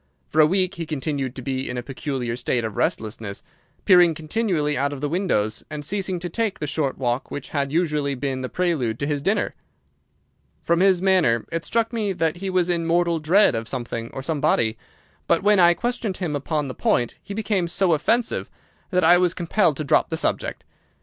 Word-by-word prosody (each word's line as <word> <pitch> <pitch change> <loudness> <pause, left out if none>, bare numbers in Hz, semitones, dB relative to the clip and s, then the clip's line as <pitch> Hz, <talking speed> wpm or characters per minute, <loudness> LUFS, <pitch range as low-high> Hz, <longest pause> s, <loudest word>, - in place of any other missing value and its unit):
For 155 - +4
a 150 - +6
week 185 +2 +1
he 170 -4 -6
continued 140 -3 -3
to 130 - -7
be 130 +1 -3
in 125 - -4
a 120 - -3
peculiar 130 -3 -3
state 120 0 -1
of 110 -3 -4
restlessness, 110 -2 -2 0.4
peering 175 -4 +6
continually 160 -3 -1
out 140 +1 0
of 145 - -6
the 145 - -1
windows, 150 - 0
and 150 -1 -6
ceasing 190 +1 -2
to 175 - -3
take 215 +4 -1
the 150 - -3
short 145 -2 -1
walk 125 0 -1
which 145 - -6
had 140 -2 -1
usually 150 -4 0
been 130 0 -3
the 130 - -4
prelude 155 -11 0
to 140 - -2
his 145 -1 -1
dinner. 195 +8 0 1.1
From 170 0 +2
his 185 -1 +3
manner 175 - +3
it 165 -1 -2
struck 230 0 0
me 210 -4 -1
that 165 -1 -1
he 190 +2 -4
was 185 -2 +1
in 170 -2 0
mortal 170 0 +2
dread 170 +4 +4
of 115 -1 -3
something 115 -2 -4
or 135 - -6
somebody, 130 -7 +1 0.5
but 170 - +2
when 205 -1 +5
I 175 -1 +6
questioned 240 -4 -2
him 165 -6 -2
upon 150 +1 -2
the 130 - -5
point 120 -1 0
he 200 0 -8
became 205 -5 0
so 175 0 +2
offensive 225 +10 0 0.4
that 180 -2 +1
I 175 +2 +6
was 180 -1 +1
compelled 170 -3 +1
to 155 - -2
drop 140 - +2
the 160 - -2
subject. - - -2
160 Hz, 205 wpm, -23 LUFS, 135-185 Hz, 1.1 s, a